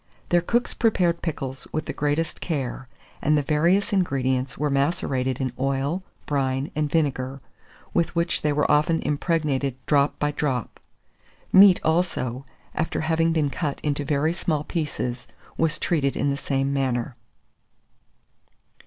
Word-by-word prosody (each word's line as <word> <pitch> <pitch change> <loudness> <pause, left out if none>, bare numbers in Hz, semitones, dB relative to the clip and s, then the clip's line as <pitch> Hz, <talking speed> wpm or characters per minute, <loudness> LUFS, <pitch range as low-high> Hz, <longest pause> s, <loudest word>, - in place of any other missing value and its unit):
Their 175 0 +4
cooks 240 +8 0
prepared 180 -7 +2
pickles 135 -5 -4
with 155 - -2
the - - -4
greatest 150 +3 -1
care, 130 -5 -3 0.3
and 150 +1 +3
the 145 - +1
various 170 +9 +2
ingredients 135 -7 0
were 150 -1 0
macerated 135 -3 0
in 130 -2 -2
oil, 135 +6 0 0.2
brine, 135 -1 -1
and 150 -1 0
vinegar, 135 -4 0 0.5
with 170 0 +1
which 170 +1 +1
they 150 - +1
were 145 0 +1
often 155 +2 +3
impregnated 145 -4 0
drop 145 -1 +2
by 150 0 0
drop. 135 -6 -2 0.7
Meat, 190 -1 +8
also, 140 -6 0 0.3
after 160 - -1
having 165 +1 +2
been 155 -4 +1
cut 145 +1 -3
into 145 -1 -1
very 150 +3 +1
small 155 -4 -1
pieces, 145 -7 -3 0.3
was 165 -1 +1
treated 140 -5 0
in 145 - +1
the - - 0
same 140 -1 -1
manner. 130 -3 -1
145 Hz, 140 wpm, -24 LUFS, 135-165 Hz, 0.7 s, Meat